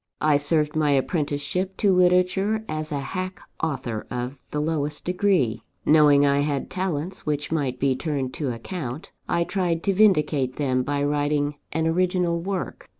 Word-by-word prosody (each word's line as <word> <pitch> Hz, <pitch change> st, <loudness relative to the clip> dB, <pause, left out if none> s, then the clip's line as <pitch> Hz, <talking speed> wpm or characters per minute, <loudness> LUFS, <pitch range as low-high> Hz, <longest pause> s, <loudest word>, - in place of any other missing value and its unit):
I 150 Hz, -1 st, +4 dB
served 150 Hz, +1 st, +1 dB
my 155 Hz, -1 st, +2 dB
apprenticeship 150 Hz, +6 st, -1 dB
to 200 Hz, -2 st, +3 dB
literature 185 Hz, +4 st, +2 dB
as 155 Hz, 0 st, -4 dB
a 145 Hz, -, -1 dB
hack 185 Hz, +4 st, -4 dB, 0.2 s
author 130 Hz, -8 st, -3 dB
of 125 Hz, +2 st, -4 dB
the 150 Hz, -, -2 dB
lowest 150 Hz, -1 st, -2 dB
degree. 180 Hz, -, +1 dB, 0.2 s
Knowing 150 Hz, -2 st, +6 dB
I 140 Hz, 0 st, +3 dB
had 145 Hz, -1 st, -1 dB
talents 180 Hz, -2 st, -3 dB
which 145 Hz, 0 st, -2 dB
might 140 Hz, -6 st, -1 dB
be 135 Hz, -1 st, +2 dB
turned 135 Hz, -3 st, -2 dB
to 140 Hz, -5 st, -2 dB
account, 130 Hz, +3 st, -6 dB, 0.2 s
I 170 Hz, -, +2 dB
tried 170 Hz, -3 st, -1 dB
to 200 Hz, -, +2 dB
vindicate 150 Hz, -10 st, +3 dB
them 130 Hz, -3 st, +1 dB
by 140 Hz, +2 st, -1 dB
writing 145 Hz, 0 st, +1 dB, 0.2 s
an 160 Hz, +1 st, 0 dB
original 175 Hz, 0 st, +1 dB
work. 190 Hz, 0 st, -4 dB
150 Hz, 155 wpm, -24 LUFS, 145-180 Hz, 0.2 s, Knowing